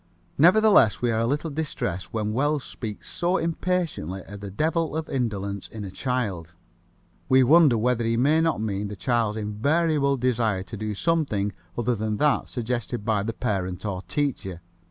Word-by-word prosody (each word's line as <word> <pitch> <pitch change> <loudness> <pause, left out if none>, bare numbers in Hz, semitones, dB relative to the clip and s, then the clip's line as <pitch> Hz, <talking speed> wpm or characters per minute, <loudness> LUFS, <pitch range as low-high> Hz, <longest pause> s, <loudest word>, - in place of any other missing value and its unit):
Nevertheless, 195 - +6
we 120 - +2
are 110 - 0
a 115 - +1
little 150 +4 -1
distressed 120 - -3
when 105 -2 -2
Wells 145 +3 +1
speaks 110 -3 -7
so 180 +2 0
impatiently 165 - -2
of 100 0 -9
the 100 0 -7
devil 160 - 0
of 160 - -3
indolence 100 -6 -3
in 110 -2 -8
a 95 - -7
child. 95 -10 -3 0.7
We 130 0 +6
wonder 145 -2 +6
whether 120 +1 +1
he 115 0 +1
may 150 +6 +3
not 160 -6 +1
mean 105 -1 -2
the 105 - -6
child's 110 +2 0
invariable 140 +7 +1
desire 115 -6 0
to 110 - -9
do 110 0 -4
something 105 - 0 0.2
other 120 +1 +1
than 110 -1 -2
that 150 +1 +1
suggested 120 -2 -3
by 110 -3 +1
parent 100 -5 -2
or 95 -3 -3
teacher. 95 - -2
115 Hz, 165 wpm, -25 LUFS, 105-145 Hz, 0.7 s, Nevertheless